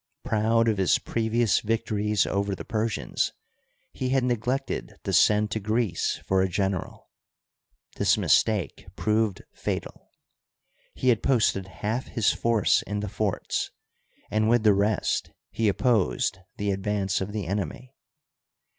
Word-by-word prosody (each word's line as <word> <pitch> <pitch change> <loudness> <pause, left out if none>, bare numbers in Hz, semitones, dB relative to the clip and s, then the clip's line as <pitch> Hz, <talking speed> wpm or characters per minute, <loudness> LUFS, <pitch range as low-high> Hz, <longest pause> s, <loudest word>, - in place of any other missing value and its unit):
Proud 115 +2 +2
of 110 -3 +1
his 95 - +4
previous 115 0 +1
victories 105 -1 0
over 100 0 -1
the - - -8
Persians, 110 -2 -1 0.6
he 130 - -2
had 135 -1 +2
neglected 125 +3 -2
to - - -2
send 105 0 +4
to 110 - -1
Greece 110 -3 -1
for 95 0 +2
a 95 - +1
general. 95 0 -3 0.9
This - - +3
mistake 105 -9 +1
proved 110 -2 0
fatal. - - -5 0.9
He 130 - +1
had 115 -3 +3
posted 105 -7 +2
half 105 - -3
his 115 -5 +2
force 115 -3 +2
in 105 0 -2
the 105 - -4
forts, - - -2 0.6
and 110 +1 +2
with 120 -1 +3
the 105 -2 +6
rest 100 +2 0 0.2
he 115 - 0
opposed 100 - +1 0.2
the 100 0 -1
advance 100 0 -1
of 95 +2 -3
the 105 -3 -3
enemy. 100 - -4
105 Hz, 135 wpm, -26 LUFS, 100-115 Hz, 0.9 s, the